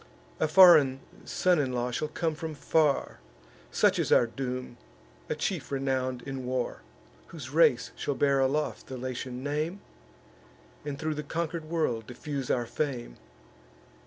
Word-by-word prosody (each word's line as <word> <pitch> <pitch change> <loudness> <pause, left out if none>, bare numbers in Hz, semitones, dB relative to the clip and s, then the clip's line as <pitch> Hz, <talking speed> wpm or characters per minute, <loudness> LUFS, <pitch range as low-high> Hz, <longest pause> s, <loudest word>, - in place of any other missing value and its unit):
A 155 - +2
foreign 155 -6 +7 0.3
son 180 -3 +2
in 130 -3 0
law 125 0 -1
shall 155 +5 -2
come 160 +1 -2
from 160 0 -6
far 150 0 +1 0.5
(Such - - +3
is - - 0
our - - +6
doom), 125 0 -5 0.5
a - - 0
chief - - -3
renown'd 130 -2 -1
in 135 -1 -5
war, 125 0 -2 0.5
Whose 140 -6 -9
race 145 -6 +4
shall 145 - -2
bear 140 -1 +2
aloft 140 +3 0
the 130 - -6
Latian 125 0 -5
name, 155 +6 -2 1.0
And 145 -1 -4
thro' 155 +1 -2
the 150 - -4
conquer'd 160 +2 -3
world 155 -9 -1
diffuse 135 +1 -5
our 120 -1 +1
fame. 120 - -3
140 Hz, 145 wpm, -28 LUFS, 125-155 Hz, 1.0 s, foreign